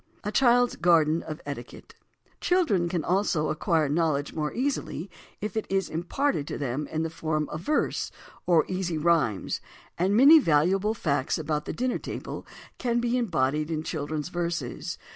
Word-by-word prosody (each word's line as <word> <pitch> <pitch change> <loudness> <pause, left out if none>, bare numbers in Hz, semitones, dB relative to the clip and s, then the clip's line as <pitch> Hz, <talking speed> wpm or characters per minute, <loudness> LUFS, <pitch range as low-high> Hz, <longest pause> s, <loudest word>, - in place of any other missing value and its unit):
A 210 - -2
CHILD'S 245 +1 +4
GARDEN 165 -2 +4
OF 155 -1 -7
ETIQUETTE 130 -4 -8 0.5
Children 230 - +2
can 170 -3 -1
also 175 -4 +1
acquire 160 0 +1
knowledge 150 -1 0
more 150 -1 -2
easily 250 - -2 0.3
if 210 +1 -4
it 220 - -2
is 195 -1 0
imparted 175 - -1
to - - -4
them 140 +1 -3
in 160 +1 -2
the 165 - -2
form 155 -2 -2
of 155 - -5
verse 300 - 0 0.4
or 165 -4 +4
easy 185 -3 -2
rhymes, 150 - +1 0.4
and 190 +4 +2
many 290 +6 +9
valuable 190 - +2
facts 140 -8 0
about 150 -1 -2
the - - -3
dinner 250 0 -1
table - - -6 0.3
can 240 -1 +1
be 240 0 0
embodied 155 - 0
in 155 -1 -2
children's 155 0 -3
verses. 170 -7 -3
170 Hz, 160 wpm, -27 LUFS, 150-210 Hz, 0.5 s, many